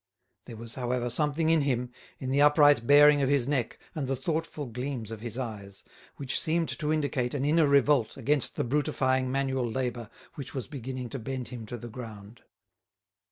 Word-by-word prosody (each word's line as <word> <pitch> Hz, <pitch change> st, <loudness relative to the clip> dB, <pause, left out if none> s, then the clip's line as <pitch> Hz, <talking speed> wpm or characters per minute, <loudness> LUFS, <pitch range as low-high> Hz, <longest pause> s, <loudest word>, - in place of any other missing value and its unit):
There 115 Hz, -, -9 dB
was, 115 Hz, +1 st, -7 dB
however, 125 Hz, -1 st, -2 dB
something 150 Hz, +4 st, +1 dB
in 165 Hz, -2 st, +4 dB
him, 125 Hz, -3 st, -1 dB, 0.3 s
in 130 Hz, -1 st, -4 dB
the 140 Hz, +1 st, +3 dB
upright 145 Hz, -4 st, +5 dB
bearing 145 Hz, 0 st, +7 dB
of 135 Hz, -, +1 dB
his 140 Hz, -3 st, +2 dB
neck 135 Hz, -5 st, -1 dB, 0.2 s
and 150 Hz, -6 st, -3 dB
the 135 Hz, -, 0 dB
thoughtful 155 Hz, +2 st, -3 dB
gleams 125 Hz, -2 st, -5 dB
of 110 Hz, -1 st, -7 dB
his 120 Hz, 0 st, -6 dB
eyes, 105 Hz, -6 st, -6 dB, 0.3 s
which 135 Hz, -2 st, -1 dB
seemed 165 Hz, +1 st, 0 dB
to 150 Hz, 0 st, -2 dB
indicate 145 Hz, -4 st, -1 dB
an 140 Hz, -1 st, -1 dB
inner 155 Hz, +1 st, +4 dB
revolt 140 Hz, -4 st, +3 dB
against 140 Hz, +2 st, +1 dB
the -, -, -1 dB
brutifying 130 Hz, -1 st, 0 dB
manual 135 Hz, -2 st, -1 dB
labour 120 Hz, -2 st, -3 dB, 0.2 s
which 140 Hz, +1 st, -8 dB
was 130 Hz, -, -4 dB
beginning 130 Hz, -2 st, -6 dB
to 135 Hz, -, -5 dB
bend 130 Hz, +1 st, -5 dB
him 120 Hz, -4 st, -8 dB
to 120 Hz, -, -6 dB
the 120 Hz, -, -8 dB
ground. 110 Hz, -2 st, -10 dB
130 Hz, 185 wpm, -28 LUFS, 120-145 Hz, 0.3 s, bearing